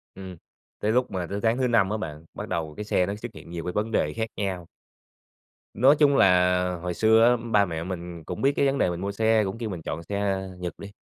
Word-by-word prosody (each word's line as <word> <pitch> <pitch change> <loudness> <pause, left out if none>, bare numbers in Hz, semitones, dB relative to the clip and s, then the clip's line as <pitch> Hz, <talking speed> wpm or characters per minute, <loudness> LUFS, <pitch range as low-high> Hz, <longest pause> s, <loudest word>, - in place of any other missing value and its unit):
Ừm, 95 -2 -9 0.4
tới 105 - 0
lúc 125 +2 +1
mà 90 -2 -3
tới 100 - -3
tháng 115 +1 +2
thứ 130 -1 +1
5 115 -5 +3
á 110 - -1
bạn, 80 -5 -7
bắt - - -6
đầu 80 -2 -3
cái 105 - -4
xe 90 -3 +2
nó 100 +2 -3
xuất 115 +2 -8
hiện - - -12
nhiều 85 -1 -5
cái 90 - -3
vấn 110 +2 -1
đề 75 -8 +1
khác 110 0 -2
nhau. 95 -4 -3 1.1
Nói 135 +6 +5
chung 145 -2 +5
là, 90 -1 +4 0.2
hồi 90 0 -3
xưa 110 +3 +4
á, 120 +1 +5
ba 100 -2 +5
mẹ 80 -3 -4
mình 85 -2 -6
cũng 90 +3 -6
biết 135 - +4
cái - - +2
vấn 135 0 +1
đề 90 - +2
mình 85 0 -4
mua 100 +1 -2
xe, 110 +1 +2
cũng 95 +2 -4
kêu 115 -2 -4
mình 90 -4 -5
chọn 80 +1 -5
xe 100 +1 -2
Nhật 90 -1 -4
đi. 100 - -9
100 Hz, 255 wpm, -25 LUFS, 90-110 Hz, 1.1 s, Nói